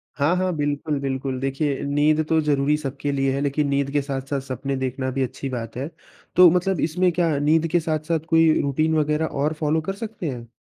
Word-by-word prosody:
हाँ, 150 +5 +2
हाँ। 185 0 0
बिल्कुल, 145 0 -1
बिल्कुल। 135 -1 -3
देखिए 135 +1 -1
नींद 150 +2 +2
तो 160 0 +3
ज़रूरी 145 -1 +2
सबके 140 -1 -3
लिए 135 -1 +1
है 140 - -1
लेकिन 145 +1 0
नींद 140 0 0
के 145 0 +1
साथ-साथ 135 0 -3
सपने 135 +1 -4
देखना 130 0 -2
भी 135 +1 0
अच्छी 135 +2 -5
बात 115 -3 -5
है। 135 +3 -3 0.5
तो 180 -1 +9
मतलब, 180 0 +1
इसमें 180 +3 +1
क्या 165 -3 +1
नींद 155 +3 +2
के 175 - +3
साथ-साथ 160 0 -1
कोई 165 -1 +5
रूटीन 155 +3 +1
वगैरह 150 +1 +1
और 150 +1 -1
फ़ॉलो 155 +1 0
कर 195 - 0
सकते 215 -6 -5
हैं? 120 -3 -7
145 Hz, 205 wpm, -23 LUFS, 135-160 Hz, 0.5 s, तो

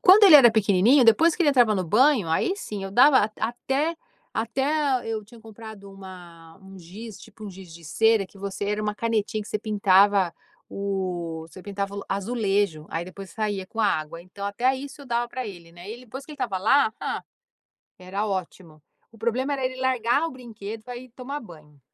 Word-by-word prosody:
Quando 400 +3 +8
ele 365 - +9
era 250 -5 +8
pequenininho, 220 +4 +4
depois, 310 +9 +5
que 355 - +1
ele 295 - +4
entrava 245 -6 +4
no 185 - -1
banho, 220 - +3
aí, 270 - +1
sim, 210 - -6
eu 195 - -6
dava 260 +6 +6
at 210 +1 -1
até 270 +8 -1 0.4
até 230 +4 -2 0.4
e, - - -3
eu 215 -2 -3
tinha 235 +2 -16
comprado 220 -2 -11
uma 175 -3 -13
um 190 0 -13
giz, 200 +5 -10
tipo, 215 - -13
um 205 - -6
giz 185 -2 -12
de 170 - -13
cera 220 +5 +2
que 195 - -21
você 200 +1 -5
era 210 +1 -1
uma 210 0 -2
canetinha, 220 -1 -1
que - - -12
você 215 - -2
pintava 200 -3 +3 0.3
o 180 -5 -4
você 185 +2 -13
pintava 200 0 -4
o 200 - -6
azulejo. 200 -6 -1
Aí, 165 +1 -3
depois, 190 +1 -10
saía 205 -3 -3
com 225 - -5
água. 165 -5 -1
Então, 195 +3 -9
até 245 +6 +1
isso 280 +1 -8
eu - - -13
dava 240 0 -1
pra 255 0 -5
ele, 175 -5 -10
né. 175 +3 -12
E - - -5
ele 245 +2 -11
depois 265 +5 -8
que 305 - -11
ele - - -11
estava 195 -8 -2
lá, 220 +4 +3
hã, - - -3 0.8
era 195 +3 -3
ótimo. 180 -5 -6 0.3
O 225 - -17
problema 245 +5 -1
era 270 -2 -2
ele 255 0 -2
largar 255 +1 +1
o - - -5
brinquedo 225 -4 -9
pra 245 0 -7
ir 255 +1 -11
tomar 265 +4 -6
banho. 155 - -15
210 Hz, 210 wpm, -25 LUFS, 190-245 Hz, 0.8 s, ele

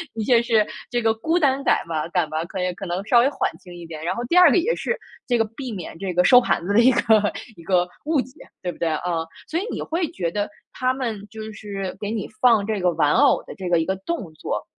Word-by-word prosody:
的 225 - -2
确 240 -1 +5
是 225 -3 +3 0.2
这 240 - 0
个 225 -1 +3
孤 320 +10 0
单 275 -4 +2
感 - - +2
嘛 160 -2 -2
感 175 -2 +1
吧， 155 +1 -2
可 185 +1 -4
以 180 0 -1
可 195 +2 -7
能 180 +3 -3
稍 240 +2 +5
微 250 +3 +4
缓 285 - -1
轻 180 -2 -13
一 175 -1 -9
点。 160 -2 -8
然 170 - -1
后 235 - -3
第 295 - -1
二 360 -2 +9
个 - - +3
也 405 +8 +2
是 475 - -2 0.3
这 245 -2 +2
个 225 - +2
避 240 +4 -7
免 185 -7 -7
这 195 -1 -3
个 180 +1 +3
收 250 +7 +7
盘 170 - 0
子 200 - -1
的 215 - +5
一 245 +3 +6
个 215 -3 +3 0.2
一 170 - -14
个 180 0 +2 0.2
误 310 -1 +2
解， 260 - -11 0.3
对 180 - -2
不 - - -14
对， 170 - 0
啊？ 155 - -2 0.4
所 325 - -1
以 - - -3
你 - - -4
会 330 +1 -1
觉 170 -3 -3
得 205 +2 -2 0.2
他 255 0 0
们 225 -6 -4
就 220 +1 -8
是 195 -3 -5
给 205 - -4
你 215 -2 -3
放 230 -5 +5
这 215 -1 -1
个 180 - +3
玩 150 -2 +2
偶 - - +4
的 - - -9
这 185 -2 -5
个 170 -1 +3
一 160 - 0
个 190 - -1
动 195 - -5
作， 155 - -4
210 Hz, 290 characters per minute, -23 LUFS, 180-245 Hz, 0.4 s, 二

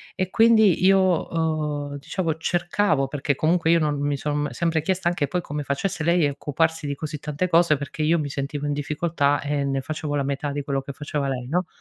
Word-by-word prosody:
E 185 -1 -1
quindi 220 -6 +5
io 195 +1 +6
ho, 160 -5 0
uhm, 145 - -5
diciamo 160 +3 -2
cercavo 175 -2 0
perché 140 0 -1
comunque 165 +3 +1
io 170 - +5
non 150 -2 0
mi 145 0 0
son 150 0 -1
sempre 160 +5 0
chiesta 185 +2 -1
anche 170 -4 0
poi 180 +6 -1
come 150 -3 -5
facesse 155 +4 -2
lei 170 -1 +3
a - - -1
occuparsi 150 +2 -1
di 140 - -2
così 150 +1 -5
tante 150 +5 -2
cose, 170 -3 +4
perché 140 +2 -6
io 165 +2 +3
mi 150 - -2
sentivo 140 +1 -4
in 145 - 0
difficoltà 145 0 0
e 145 0 -1
ne 135 -1 -1
facevo 150 +1 -4
la 140 - 0
metà 140 +1 -2
di 145 +1 -3
quello 140 -1 -1
che 140 - -7
faceva 145 0 -3
lei 125 -2 -4
no? 175 +5 0
150 Hz, 220 wpm, -24 LUFS, 145-170 Hz, -, io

